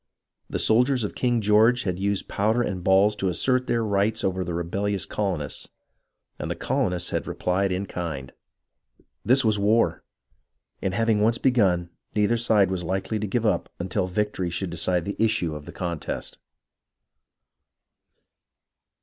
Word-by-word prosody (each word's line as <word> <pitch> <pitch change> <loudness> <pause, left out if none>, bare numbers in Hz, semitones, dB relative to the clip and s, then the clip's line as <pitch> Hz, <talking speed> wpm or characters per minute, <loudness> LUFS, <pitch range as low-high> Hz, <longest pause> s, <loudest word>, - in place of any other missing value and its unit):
The - - -2
soldiers 125 +2 +3
of 105 - -3
King 120 -2 +1
George 110 +4 +4
had 90 -1 -2
used 100 0 -1
powder 110 +4 +1
and 95 -6 -3
balls 100 +2 +4
to 95 - 0
assert 125 +8 +1
their 115 -1 +1
rights 105 +1 0
over 95 -1 0
the 85 -1 -4
rebellious 95 +3 -1
colonists, 95 -8 -2 0.7
and - - -4
the - - -2
colonists 90 -1 -1
had - - -2
replied 95 +2 0
in 95 +2 -1
kind. 80 -9 -5 0.9
This 130 +1 +4
was 110 -2 +2
war, 100 -6 +2 0.8
and 95 -1 -1
having 115 -1 +2
once 115 +2 +3
begun, 95 -9 +2 0.2
neither 105 +2 +3
side 110 -5 +3
was 90 -2 -2
hkely 95 +4 -2
to 105 - -2
give 115 +4 -1
up 105 - +1
until 90 +2 -2
victory 95 -1 -1
should 90 +1 -3
decide 90 0 0
the 100 - -4
issue 105 -8 +1
of 75 -1 -8
the - - -7
contest. 85 -3 -4
100 Hz, 150 wpm, -25 LUFS, 90-110 Hz, 0.9 s, George